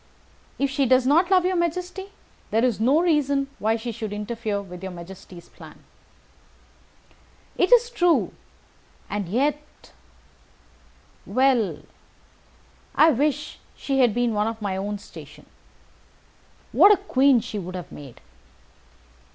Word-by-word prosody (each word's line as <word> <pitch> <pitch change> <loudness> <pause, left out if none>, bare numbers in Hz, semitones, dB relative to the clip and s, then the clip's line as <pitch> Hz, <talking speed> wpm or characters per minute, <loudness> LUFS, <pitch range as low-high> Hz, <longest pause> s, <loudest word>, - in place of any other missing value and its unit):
If 275 -1 0
she 270 0 +1
does 255 +1 +4
not 330 +7 +3
love 370 -2 +4
your 370 0 +1
majesty, 360 +3 -3 0.4
there 225 +3 +2
is 240 -5 0
no 270 +8 +3
reason 285 -5 +1
why 220 +1 +1
she 230 +1 -5
should 220 -2 -6
interfere 210 0 -3
with 180 -3 -10
your 190 -1 -6
majesty's 180 0 -12
plan." - - -15 1.7
"It 365 - +1
is 485 -1 +5
true. 355 -7 +2 0.8
And 200 -4 -3
yet 290 +7 -3 1.4
Well, 250 -1 +1 1.1
I 320 - +6
wish 295 +2 -1 0.2
she 270 -1 -2
had 245 -5 +3
been 240 -2 0
of 220 +2 -1
my 200 -3 -3
own 205 +2 -3
station. 205 - -13 1.3
What 410 - +7
a 415 - +5
queen 275 -9 +3
she 215 -1 -6
would 185 0 -7
have 180 - -8
made!" 140 -5 -12
250 Hz, 125 wpm, -24 LUFS, 205-300 Hz, 1.7 s, What